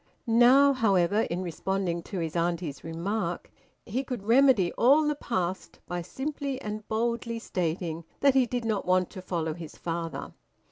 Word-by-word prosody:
Now, 250 +4 +6
however, 205 -3 +2
in 180 +2 -2
responding 180 0 -2
to 195 - -4
his 165 -2 -3
auntie's 170 -3 -2
remark, 170 +2 -3 0.3
he 250 +6 -2
could 250 -6 -5
remedy 230 -5 +4
all 290 +5 +4
the 300 - +2
past 190 -10 -3
by 175 0 -3
simply 275 - -4
and 215 -3 -6
boldly 235 +1 -1
stating 170 -5 -3 0.2
that 275 -1 +5
he 260 -2 +4
did 245 -1 -3
not 215 -5 -1
want 185 -1 +2
to 190 - -8
follow 165 -4 -2
his 165 -1 -10
father. 165 -1 -4
195 Hz, 155 wpm, -28 LUFS, 170-240 Hz, 0.3 s, Now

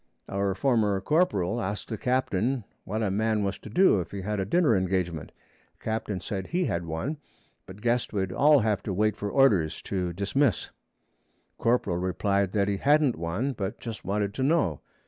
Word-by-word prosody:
Our 100 -1 -1
former 105 -4 +2
corporal 115 - +1
asked 100 0 -4
the 115 - -2
captain 125 -1 0 0.2
what 110 +3 -2
a 100 - 0
man 110 +1 +1
was 100 0 -2
to - - -10
do 150 - +4
if 90 - -4
he 100 - -6
had 105 +2 -2
a 95 - 0
dinner 150 - +3
engagement. 90 -4 -1 0.5
Captain 110 -3 -3
said 95 +1 -4
he 180 +1 0
had 85 - -2
one, 80 - -3 0.5
but 95 +2 -11
guessed 120 +1 0
we'd 95 -3 -1
all 145 +6 +5
have 105 -3 0
to 100 - -4
wait 105 +2 +1
for 105 -1 -4
orders 100 - +3
to 90 -3 -2
dismiss. 100 - 0 0.9
Corporal 115 -7 +1
replied 95 +1 0
that 100 -2 +2
he 100 -1 0
hadn't 145 +1 +3
one, 90 +12 -2
but 100 -5 -4
just 115 -2 -7
wanted 100 +1 -1
to 130 - -4
know. 135 - +2
105 Hz, 180 wpm, -27 LUFS, 95-120 Hz, 0.9 s, all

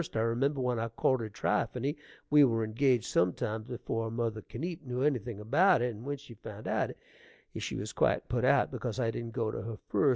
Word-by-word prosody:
I - - +2
remember 130 +5 +1
when 125 -2 0
I 115 - -1
courted 115 -1 0
Trypheny 125 +7 0 0.4
we 150 0 +8
were 115 -4 +3
engaged 120 +2 +2
some 90 0 +2
time 110 +1 -2
before 115 -1 -3
mother 115 -1 -2
Kenipe 165 - -5
knew 125 -1 -2
anything 120 -7 0
about 140 - +4
it, 125 -1 0
and 110 +2 -10
when 145 0 -2
she 140 -3 -12
found 110 -1 -9
it - - -3
out - - +1 0.7
she - - -3
was - - -4
quite - - +2
put 120 -1 0
out 140 +2 +4
because 125 -1 -3
I 115 -2 +1
didn't 115 0 -5
go 115 -3 0
to - - -4
her 110 -1 -5
first. 145 - +4
120 Hz, 215 wpm, -31 LUFS, 110-130 Hz, 0.7 s, we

